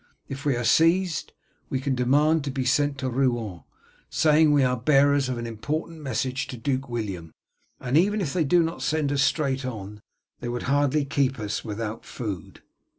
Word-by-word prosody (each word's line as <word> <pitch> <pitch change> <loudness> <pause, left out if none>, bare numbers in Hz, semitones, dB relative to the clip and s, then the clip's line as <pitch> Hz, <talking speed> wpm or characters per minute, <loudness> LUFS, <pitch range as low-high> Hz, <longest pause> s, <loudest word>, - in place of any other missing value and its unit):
If 135 +1 -7
we 140 -3 +2
are 120 - -2
seized, 165 +8 +2 0.4
we 130 - -1
can 135 +1 -1
demand 145 +5 +3
to - - -2
be 130 -1 -2
sent 145 +2 +2
to 130 0 -2
Rouen, 120 -8 -1 0.5
saying 155 0 +4
we 145 -2 +4
are 125 0 +2
bearers 140 +2 +3
of 125 - -2
an 120 - -4
important 150 +8 -4
message 130 -1 -2
to 130 - -7
Duke 130 +2 -2
William, 100 -9 -4 0.5
and 125 +2 -2
even 205 +6 +3
if 160 -8 -2
they 175 - +2
do 170 +4 +4
not 165 +1 -4
send 155 -3 0
us 140 -1 +1
straight 135 -2 +1
on, 105 -4 -6 0.4
they 120 - -5
would 120 0 -3
hardly 145 +1 +2
keep 140 -1 0
us 105 -1 -3
without 110 0 -5
food." 100 -9 -7
135 Hz, 185 wpm, -25 LUFS, 120-150 Hz, 0.5 s, saying